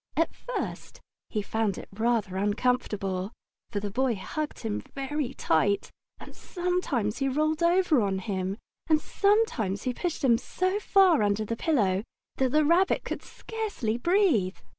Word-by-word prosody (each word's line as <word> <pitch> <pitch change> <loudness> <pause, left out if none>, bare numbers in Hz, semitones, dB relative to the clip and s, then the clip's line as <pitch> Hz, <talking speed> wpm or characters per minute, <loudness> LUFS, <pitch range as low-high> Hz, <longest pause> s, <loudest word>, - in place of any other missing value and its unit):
At 330 - +2
first - - -5 0.3
he 210 -2 -2
found 215 -2 -1
it - - -8
rather 220 -3 0
uncomfortable, 205 -2 0 0.4
for 205 - -2
the 205 0 -4
Boy 255 +1 +1
hugged 295 +10 -5
him 220 -2 -2 0.2
very 275 -1 -3
tight, 200 +3 +1 0.3
and - - -11
sometimes 345 - -1
he 275 -1 +1
rolled 310 +3 0
over 340 -5 +4
on 195 -2 0
him, 190 0 -3 0.3
and 310 -1 +5
sometimes 355 - +1
he 255 - -1
pushed 340 +2 -3
him 235 -4 +4
so 370 +8 -1
far 385 - +4
under 205 +1 +1
the 230 - -2
pillow 205 - +1 0.4
that 260 -1 +2
the 305 +1 +3
Rabbit 345 +5 +3
could - - -4
scarcely 420 - -4
breathe. 285 - +2
250 Hz, 150 wpm, -27 LUFS, 205-330 Hz, 0.4 s, and